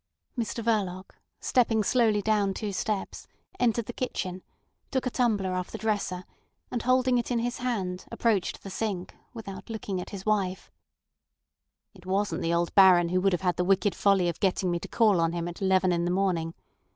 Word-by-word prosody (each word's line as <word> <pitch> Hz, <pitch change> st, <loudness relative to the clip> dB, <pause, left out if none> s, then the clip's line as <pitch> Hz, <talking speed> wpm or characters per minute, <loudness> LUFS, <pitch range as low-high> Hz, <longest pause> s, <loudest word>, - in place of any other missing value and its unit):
Mr 230 Hz, -1 st, -3 dB
Verloc, 195 Hz, -5 st, -1 dB, 0.3 s
stepping 225 Hz, -3 st, +2 dB
slowly 220 Hz, -2 st, +2 dB
down 205 Hz, -2 st, +1 dB
two 210 Hz, -3 st, -3 dB
steps, 210 Hz, 0 st, -3 dB, 0.3 s
entered 235 Hz, -2 st, +2 dB
the 240 Hz, -, -6 dB
kitchen, 185 Hz, -8 st, -3 dB, 0.5 s
took 260 Hz, -2 st, -1 dB
a 255 Hz, -, -1 dB
tumbler 210 Hz, -7 st, +1 dB
off 180 Hz, 0 st, -3 dB
the -, -, -6 dB
dresser, 205 Hz, -4 st, -2 dB, 0.5 s
and 240 Hz, -, -2 dB
holding 255 Hz, 0 st, +3 dB
it 235 Hz, -, -3 dB
in 245 Hz, -, +1 dB
his 240 Hz, +1 st, -2 dB
hand, 195 Hz, -8 st, -2 dB
approached 215 Hz, -6 st, 0 dB
the 195 Hz, -, -7 dB
sink, 195 Hz, -4 st, -3 dB, 0.2 s
without 195 Hz, -4 st, -8 dB
looking 205 Hz, -4 st, -3 dB
at -, -, -8 dB
his 195 Hz, -2 st, -8 dB
wife. 195 Hz, -3 st, -1 dB, 1.2 s
"It 185 Hz, -2 st, -16 dB
wasn't 190 Hz, -3 st, 0 dB
the 165 Hz, -, 0 dB
old 170 Hz, 0 st, 0 dB
Baron 180 Hz, -3 st, +6 dB
who 185 Hz, +1 st, +1 dB
would 195 Hz, 0 st, +2 dB
have 175 Hz, -, 0 dB
had 180 Hz, -3 st, 0 dB
the 180 Hz, -, +1 dB
wicked 195 Hz, +2 st, +2 dB
folly 195 Hz, -3 st, +3 dB
of 170 Hz, -, -3 dB
getting 185 Hz, -1 st, +1 dB
me 175 Hz, -, 0 dB
to -, -, -7 dB
call 210 Hz, -7 st, +3 dB
on 165 Hz, 0 st, +1 dB
him 170 Hz, 0 st, -2 dB
at 175 Hz, +3 st, -8 dB
eleven 190 Hz, -1 st, +3 dB
in 170 Hz, 0 st, 0 dB
the -, -, 0 dB
morning. 175 Hz, -3 st, 0 dB
195 Hz, 190 wpm, -27 LUFS, 180-225 Hz, 1.2 s, Baron